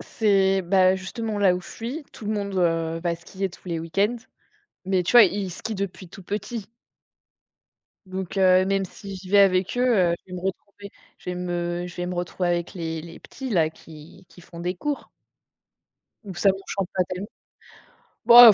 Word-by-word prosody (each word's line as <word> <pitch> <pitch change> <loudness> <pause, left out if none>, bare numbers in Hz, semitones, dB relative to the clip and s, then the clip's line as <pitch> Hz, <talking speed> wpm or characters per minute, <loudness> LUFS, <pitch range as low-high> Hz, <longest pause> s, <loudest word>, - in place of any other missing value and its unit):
c'est 195 -3 +2
bah, 185 +1 +4
justement, 210 +3 -4
là 185 -3 +5
où - - -5
je - - -14
suis, 255 +7 -6
tout - - -11
le 210 - -1
monde, 200 -2 -3
heu, 165 -2 +1
va 170 0 -1
skier 190 +3 -4
tous 175 - -17
les 170 -2 -2
week-ends, 195 +8 +1 0.7
mais 190 -1 +2
tu 175 - -1
vois, 240 -2 +10
ils 195 0 -1
skient 220 +5 -5
depuis 190 -2 -5
tout 195 - -12
petit. 215 +3 -5 1.4
Donc, 185 0 -5
heu, 185 -1 +5
même 195 0 +1
si 195 +2 -9
j'y 185 0 -11
vais 205 - +5
avec 190 +1 +4
eux, - - +3 0.3
heu, - - +2
je 185 - -13
vais - - -4
me - - -5
retrouver 200 +2 -6 0.3
je - - -6
vais 180 - -4
me 175 0 -2
je 180 - -10
vais 175 0 -3
me 180 - -3
retrouver 175 +1 -2
avec 175 0 -1
les 165 -3 -3
les 165 +1 -11
petits 265 -1 -8
là, 165 -6 +3
qui 160 +4 -14
qui - - -16
font 170 0 -13
des 175 +2 -2
cours. 290 +10 -3 1.2
Donc 190 -4 -7
ça 195 - +5
m'enchante 195 -1 -3
pas 185 - +3
tellement. 185 +3 -5 1.0
Bah, 240 -1 +11
185 Hz, 195 wpm, -24 LUFS, 175-200 Hz, 1.4 s, Bah